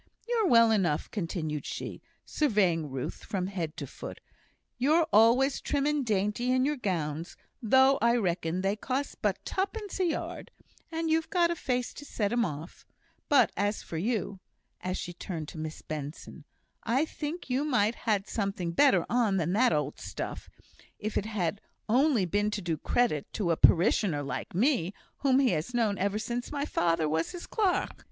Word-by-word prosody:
You're 460 Hz, -4 st, +2 dB
well 230 Hz, -5 st, +6 dB
enough," 180 Hz, -9 st, +1 dB
continued 165 Hz, -6 st, -3 dB
she, -, -, -6 dB, 0.2 s
surveying 190 Hz, -, +1 dB
Ruth 130 Hz, -1 st, -5 dB
from 185 Hz, -3 st, -2 dB
head 175 Hz, -5 st, -4 dB
to -, -, -4 dB
foot; -, -, -9 dB, 0.6 s
"you're 310 Hz, +6 st, +4 dB
always 245 Hz, +5 st, +5 dB
trim 285 Hz, -1 st, 0 dB
and 300 Hz, -1 st, +1 dB
dainty 210 Hz, +2 st, 0 dB
in 255 Hz, 0 st, +3 dB
your 295 Hz, +1 st, +1 dB
gowns, 165 Hz, -, -3 dB, 0.2 s
though 265 Hz, +4 st, +5 dB
I 235 Hz, +1 st, +4 dB
reckon 180 Hz, -5 st, 0 dB
they 195 Hz, +2 st, +1 dB
cost 260 Hz, +6 st, -3 dB
but -, -, +1 dB
tuppence 400 Hz, +1 st, -3 dB
a 370 Hz, -, +3 dB
yard, 330 Hz, -, -3 dB, 0.4 s
and 325 Hz, 0 st, -1 dB
you've 320 Hz, 0 st, +2 dB
a 340 Hz, -1 st, +3 dB
face 250 Hz, -5 st, -2 dB
to -, -, -10 dB
set 215 Hz, -6 st, -2 dB
'em 240 Hz, 0 st, +3 dB
off; 155 Hz, 0 st, -7 dB, 0.5 s
but 290 Hz, -, +5 dB
as 205 Hz, +2 st, -1 dB
for 165 Hz, -, -6 dB
you" 200 Hz, -1 st, -2 dB, 0.4 s
(as 185 Hz, 0 st, -2 dB
she 175 Hz, -, -5 dB
turned 165 Hz, -3 st, -6 dB
to 155 Hz, -, -9 dB
Miss 155 Hz, 0 st, -6 dB
Benson), 150 Hz, 0 st, -7 dB, 0.4 s
"I 260 Hz, +7 st, +1 dB
think 310 Hz, +2 st, -5 dB
you 260 Hz, +2 st, 0 dB
might 230 Hz, -7 st, +2 dB
ha' -, -, -17 dB
had 205 Hz, -4 st, +1 dB
something 195 Hz, -5 st, -2 dB
better 275 Hz, +10 st, +4 dB
on 230 Hz, -5 st, +2 dB
than 170 Hz, 0 st, 0 dB
that 245 Hz, +5 st, +4 dB
old 150 Hz, -2 st, -1 dB
stuff, -, -, -6 dB, 0.5 s
if 215 Hz, 0 st, -4 dB
it 210 Hz, -, 0 dB
had 200 Hz, -2 st, -2 dB, 0.3 s
only 250 Hz, -2 st, +3 dB
been 205 Hz, +4 st, +1 dB
to 210 Hz, -1 st, -3 dB
do 170 Hz, -2 st, 0 dB
credit 155 Hz, -, 0 dB
to 185 Hz, -6 st, 0 dB
a -, -, +3 dB
parishioner 170 Hz, -3 st, +4 dB
like 135 Hz, +4 st, -5 dB
me, 210 Hz, -, +2 dB, 0.2 s
whom 265 Hz, -2 st, +3 dB
he 270 Hz, -4 st, +4 dB
has 170 Hz, +9 st, -2 dB
known 215 Hz, -5 st, +1 dB
ever 200 Hz, +2 st, 0 dB
sin' 235 Hz, +3 st, -2 dB
my 285 Hz, -1 st, -2 dB
father 165 Hz, -, +1 dB
was 160 Hz, +2 st, -1 dB
his 355 Hz, -, -7 dB
clerk." 405 Hz, -5 st, +1 dB
210 Hz, 175 wpm, -29 LUFS, 175-265 Hz, 0.6 s, well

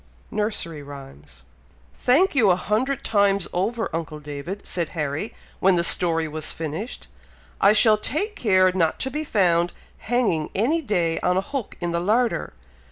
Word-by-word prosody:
Nursery 205 Hz, -8 st, -2 dB
Rhymes. 135 Hz, -, -12 dB, 0.5 s
"Thank 310 Hz, +10 st, +3 dB
you, 235 Hz, -8 st, +4 dB
a 180 Hz, -, +5 dB
hundred 235 Hz, +9 st, -1 dB
times 200 Hz, -3 st, +2 dB
over, 225 Hz, +6 st, -1 dB
uncle 155 Hz, -2 st, -4 dB
David!" 150 Hz, +7 st, -7 dB
said 170 Hz, -3 st, -3 dB
Harry, 150 Hz, +7 st, -3 dB, 0.2 s
when 190 Hz, 0 st, +4 dB
the 170 Hz, -, +2 dB
story 165 Hz, -2 st, +3 dB
was 155 Hz, 0 st, -4 dB
finished. 165 Hz, +9 st, -6 dB, 0.5 s
"I 200 Hz, +2 st, +6 dB
shall 215 Hz, -1 st, +5 dB
take 400 Hz, -, -2 dB
care 185 Hz, -, +3 dB
not 170 Hz, -4 st, 0 dB
to 265 Hz, -, -2 dB
be 300 Hz, +2 st, -3 dB
found 175 Hz, -, +2 dB, 0.3 s
hanging 220 Hz, -10 st, 0 dB
any 280 Hz, -, +1 dB
day 175 Hz, -, 0 dB
on 180 Hz, 0 st, +1 dB
a -, -, +4 dB
hook 255 Hz, +2 st, -5 dB
in 175 Hz, -1 st, -2 dB
the 170 Hz, -, 0 dB
larder! 225 Hz, -, 0 dB
185 Hz, 160 wpm, -23 LUFS, 165-225 Hz, 0.5 s, I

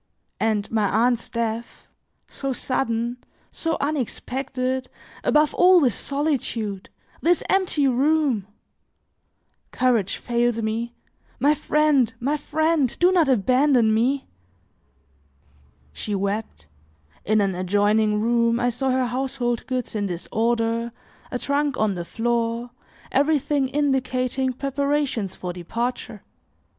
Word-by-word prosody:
And 215 Hz, -2 st, 0 dB
my 215 Hz, -3 st, +1 dB
aunt's 235 Hz, +3 st, +1 dB
death, 230 Hz, 0 st, -4 dB, 0.4 s
so 275 Hz, -1 st, -4 dB
sudden, 240 Hz, -2 st, -2 dB, 0.3 s
so 325 Hz, -1 st, -2 dB
unexpected, 260 Hz, -2 st, -2 dB, 0.4 s
above 300 Hz, 0 st, +3 dB
all 365 Hz, 0 st, +6 dB
this 255 Hz, -8 st, +3 dB
solitude! 235 Hz, -8 st, -2 dB, 0.3 s
this 350 Hz, +1 st, +2 dB
empty 365 Hz, -7 st, +2 dB
room! 270 Hz, -5 st, +2 dB, 1.2 s
Courage 235 Hz, -7 st, +1 dB
fails 240 Hz, -1 st, 0 dB
me; 230 Hz, +2 st, -2 dB, 0.4 s
my 290 Hz, +2 st, +4 dB
friend, 300 Hz, -5 st, +2 dB
my 280 Hz, +5 st, 0 dB
friend, 305 Hz, -2 st, 0 dB
do 355 Hz, +1 st, +4 dB
not 345 Hz, -5 st, +3 dB
abandon 255 Hz, -1 st, +3 dB
me!" 260 Hz, +5 st, +1 dB, 1.7 s
She 205 Hz, -, -3 dB
wept; 200 Hz, -, -3 dB, 0.6 s
in 215 Hz, +1 st, +2 dB
an 195 Hz, -2 st, +1 dB
adjoining 205 Hz, +3 st, +2 dB
room, 235 Hz, +1 st, +2 dB
I 245 Hz, 0 st, +2 dB
saw 265 Hz, +3 st, -1 dB
her 255 Hz, 0 st, +2 dB
household 245 Hz, -1 st, -2 dB
goods 255 Hz, -2 st, -3 dB
in 205 Hz, -2 st, -1 dB
disorder, 230 Hz, +5 st, -1 dB, 0.4 s
a 250 Hz, -, -2 dB
trunk 285 Hz, +1 st, 0 dB
on 215 Hz, -2 st, +1 dB
the 175 Hz, -2 st, -5 dB
floor, 235 Hz, +2 st, -1 dB, 0.4 s
everything 285 Hz, -1 st, +2 dB
indicating 260 Hz, -2 st, 0 dB
preparations 275 Hz, -6 st, -1 dB
for 180 Hz, -1 st, -5 dB
departure. 225 Hz, +4 st, -4 dB
245 Hz, 110 wpm, -23 LUFS, 225-275 Hz, 1.7 s, all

